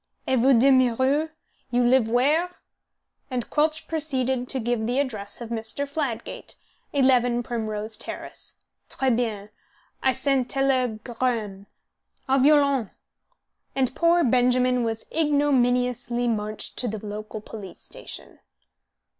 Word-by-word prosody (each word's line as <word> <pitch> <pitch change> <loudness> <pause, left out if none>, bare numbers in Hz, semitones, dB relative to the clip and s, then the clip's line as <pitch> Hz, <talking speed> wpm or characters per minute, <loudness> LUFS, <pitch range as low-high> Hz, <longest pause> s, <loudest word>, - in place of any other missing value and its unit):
"Et 260 -1 +2
vous 260 +2 +5
demeurez? 260 +4 +3 0.4
You 245 0 +2
live 245 -1 +4
where?" 300 +9 +2 0.7
And 250 -3 -3
Quelch 310 +1 +1
proceeded 265 -5 -1
to 265 - 0
give 230 -1 -1
the 245 +2 0
address 220 -7 -3
of 235 - -6
Mr. 230 +5 -3
Fladgate, 280 -5 -4 0.4
11 245 -3 +3
Primrose 220 -2 -3
Terrace. - - -6 0.3
"Tres 265 -2 +1
bien. 215 -4 -2 0.5
I 265 - +3
send 260 -1 +1
teleg 255 -5 0
r 240 -2 -9
r 255 -1 +4
amme. 200 -2 -8 0.6
Au 270 +1 +3
violon!" 280 -4 +4 0.9
And 260 -2 +1
poor 340 +1 +4
Benjamin 250 0 +3
was 225 -1 -3
ignominiously 250 -5 +1
marched 215 -2 -3
to 250 - -1
the 215 -1 -5
local 215 +1 -6
police 210 -2 -9
station. - - -10
250 Hz, 125 wpm, -25 LUFS, 225-270 Hz, 0.9 s, vous